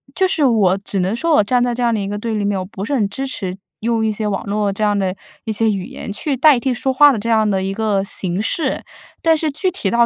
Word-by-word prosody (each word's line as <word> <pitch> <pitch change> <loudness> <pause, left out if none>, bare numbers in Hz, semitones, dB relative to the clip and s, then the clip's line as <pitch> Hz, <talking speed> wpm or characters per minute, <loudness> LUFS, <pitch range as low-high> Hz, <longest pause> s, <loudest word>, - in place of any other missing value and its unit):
就 380 - +3
是 325 -5 0
我 205 -7 +3
只 200 0 -4
能 185 +4 0
说 330 +6 0
我 215 - +5
站 245 +4 +2
在 245 -1 0
这 250 - -4
样 235 -1 +2
的 220 - 0
一 195 - -3
个 205 +1 -3
对 225 +1 -3
立 210 - -1
面， 200 -1 0
我 185 - -4
不 190 0 -7
是 285 - -3
很 215 -6 +1
支 270 +7 -4
持 190 -7 -4 0.2
用 230 0 0
一 220 - +1
些 215 0 -3
网 200 -2 -2
络 205 0 0
这 215 - -3
样 205 -1 +2
的 190 -2 -1 0.3
一 220 - -2
些 220 +1 +1
语 195 -3 -3
言 - - -7
去 280 +6 -2
代 285 -1 +5
替 260 +1 0
说 265 +2 -1
话 290 +2 +7
的 235 - -2
这 230 +3 -4
样 220 -1 +3
的 190 -2 0
一 195 - -2
个 205 -2 0
形 190 -1 -1
式。 310 +8 -1 0.4
但 325 -1 +5
是 310 -1 0
具 370 +7 -1
体 335 - -2
到 235 0 +4
220 Hz, 315 characters per minute, -18 LUFS, 200-250 Hz, 0.4 s, 话